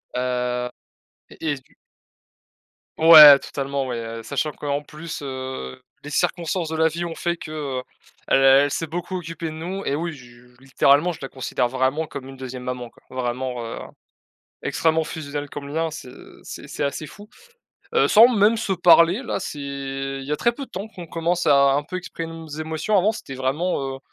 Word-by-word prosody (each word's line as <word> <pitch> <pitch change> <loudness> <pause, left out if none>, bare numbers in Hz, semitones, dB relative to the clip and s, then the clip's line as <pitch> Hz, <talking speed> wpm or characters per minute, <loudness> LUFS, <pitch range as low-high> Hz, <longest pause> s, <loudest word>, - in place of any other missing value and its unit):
Heu 125 -1 -1 0.6
et 155 -2 -3
est-ce 135 - -6
du - - -29 1.2
Ouais, 155 -3 +11
totalement, 140 -1 -3
ouais, 120 -2 -3 0.2
heu, - - -7
sachant 140 +5 -2
qu'en 145 0 -3
plus, 155 +1 -8
heu, 130 - -6 0.2
les 150 - -8
circonstances 175 +1 -1
de 160 - -3
la 160 0 +3
vie 170 +2 -4
ont 165 - -5
fait 170 0 -2
que, 155 - -9 0.3
heu, - - -7 0.4
elle 135 - +4
elle 135 +2 +6
s'est 165 - -2
beaucoup 175 +4 -5
occupée 165 -1 -6
de - - -4
nous 175 +5 -5
et 140 - -1
oui 165 +2 -3
je 120 -3 -15 0.2
littéralement 140 +5 +3
je 165 - -8
la - - -3
considère 130 -1 -2
vraiment 130 +5 0
comme 135 -3 -8
une 135 - -11
2e 130 -1 -7
maman 125 -1 -5
quoi, - - -25
vraiment, 125 -1 -3
heu, 115 - -6 0.8
extrêmement 160 0 +1
fusionnel 145 -2 -6
comme 140 -1 -7
lien, 160 +2 -1
c'est 150 -4 -9 0.3
c'est - - -9
c'est - - -3
assez 140 +2 -3
fou, 205 +6 -13 0.7
heu, 465 - +4
sans 225 +2 +8
même 220 -2 +3
se 210 -3 -1
parler 175 +3 +5
là, 245 - -3
c'est 165 -6 -6
il 135 -1 -5
y 145 - -5
a - - +2
très 235 +10 +2
peu 275 +3 -7
de - - -29
temps 195 +4 -5
qu'on 180 -5 -10
commence 170 +2 -1
à 140 -1 +5
un 145 +1 0
peu 185 +5 -5
exprimer 165 -2 -6
nos 165 -1 -9
émotions. 155 +6 -1
Avant, 200 +3 +3
c'était 135 -10 -8
vraiment, 135 0 -1
heu, - - -18
150 Hz, 195 wpm, -23 LUFS, 135-170 Hz, 1.2 s, Ouais